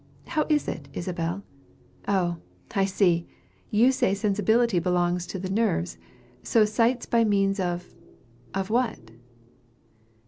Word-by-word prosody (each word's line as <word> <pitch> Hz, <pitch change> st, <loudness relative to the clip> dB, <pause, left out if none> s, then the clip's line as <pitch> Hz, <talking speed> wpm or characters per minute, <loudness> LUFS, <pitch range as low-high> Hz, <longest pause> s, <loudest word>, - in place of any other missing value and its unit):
How 305 Hz, -, -1 dB
is 300 Hz, -1 st, +2 dB
it, -, -, -5 dB
Isabel? 175 Hz, +2 st, -3 dB, 0.6 s
Oh, 180 Hz, -4 st, +1 dB, 0.4 s
I 195 Hz, -, +3 dB
see! 185 Hz, -3 st, +2 dB, 0.4 s
You 235 Hz, +5 st, +4 dB
say 255 Hz, -7 st, +1 dB
sensibility 210 Hz, +1 st, +2 dB
belongs 175 Hz, 0 st, 0 dB
to -, -, -5 dB
the 185 Hz, 0 st, -4 dB
nerves. 195 Hz, -, 0 dB, 0.4 s
So 225 Hz, -2 st, +3 dB
sights 230 Hz, +3 st, +1 dB
by 235 Hz, -1 st, +3 dB
means 195 Hz, -2 st, +2 dB
of 175 Hz, -1 st, -3 dB, 0.6 s
of 195 Hz, +1 st, -2 dB
what? 225 Hz, -, -1 dB
195 Hz, 125 wpm, -26 LUFS, 175-225 Hz, 0.6 s, You